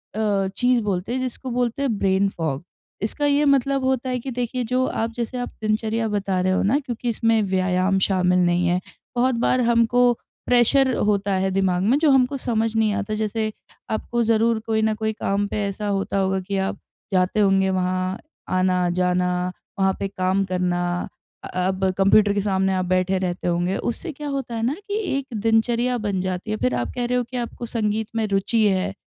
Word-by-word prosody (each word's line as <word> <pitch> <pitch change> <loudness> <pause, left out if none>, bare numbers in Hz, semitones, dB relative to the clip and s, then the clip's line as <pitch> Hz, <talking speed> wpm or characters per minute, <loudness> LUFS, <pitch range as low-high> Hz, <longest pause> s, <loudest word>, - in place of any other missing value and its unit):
अ, 205 -3 +1
चीज़ 245 -1 +3
बोलते 200 +2 -2
हैं, 260 - -1
जिसको 255 +1 -5
बोलते 245 +2 -1
हैं 235 -7 0
ब्रेन 195 0 +2
फॉग। 160 -6 -3 0.4
इसका 225 +8 -1
ये 290 +1 +3
मतलब 275 -1 +2
होता 260 -1 0
है 250 -1 -1
कि 260 +2 -6
देखिए, 245 +1 -2
जो 255 +2 +1
आप 225 +1 -2
जैसे 240 +2 -4
आप 245 - -3
दिनचर्या 220 +1 0
बता 200 -2 -1
रहे 185 +1 +1
हो - - +1
ना, 220 +8 +3
क्योंकि 245 -3 -4
इसमें 225 0 +2
व्यायाम 185 +1 +2
शामिल 180 -2 +2
नहीं 175 0 +2
है, 180 +1 +2 0.4
बहुत 245 +1 +2
बार 255 - +3
हमको 235 +1 +3 0.4
प्रेशर 250 +2 +4
होता 200 -1 +1
है 190 0 0
दिमाग 185 -1 +1
में 245 +7 +3
जो 310 -2 +3
हमको 265 +1 +3
समझ 225 -3 -1
नहीं 220 -1 +2
आता, 210 0 -2
जैसे 215 0 -1 0.4
आपको 235 +2 -1
ज़रूर 225 0 +2
कोई 220 -1 +1
न 220 0 +2
कोई 220 0 -2
काम 205 -1 -1
पे 210 - -2
ऐसा 205 +1 -4
होता 195 0 -1
होगा 190 0 +1
कि 195 +1 -3
आप 190 0 -2 0.3
जाते 185 +3 +2
होंगे 195 -1 +3
वहाँ, 185 +1 -1 0.3
आना-जाना, 180 0 +1 0.3
वहाँ 190 0 +3
पे 195 - -1
काम 190 0 0
करना 175 -1 -1 0.4
अ, - - -6 0.2
अब 190 0 -2
कंप्यूटर 200 +1 +5
के 205 - 0
सामने 190 -1 +1
आप 185 0 0
बैठे 185 +1 +1
रहते 180 -1 -3
होंगे। 175 +2 0
उससे 320 +8 -3
क्या 295 +1 -7
होता 270 -4 -3
है 225 - -2
ना 260 - +1
कि 405 - -4 0.2
एक 275 - -3 0.2
दिनचर्या 235 +2 +2
बन 205 -4 -2
जाती 185 +2 -3
है, 215 - -1
फिर 125 -7 0
आप 120 -1 -1
कह 245 -1 -1
रहे 250 +1 0
हो 245 - +1
कि 250 +2 -7
आपको 240 0 -4
संगीत 220 -2 -1
में 225 -1 +1
रुचि 200 +3 +1
है 190 -1 0
210 Hz, 200 wpm, -23 LUFS, 190-240 Hz, 0.4 s, कंप्यूटर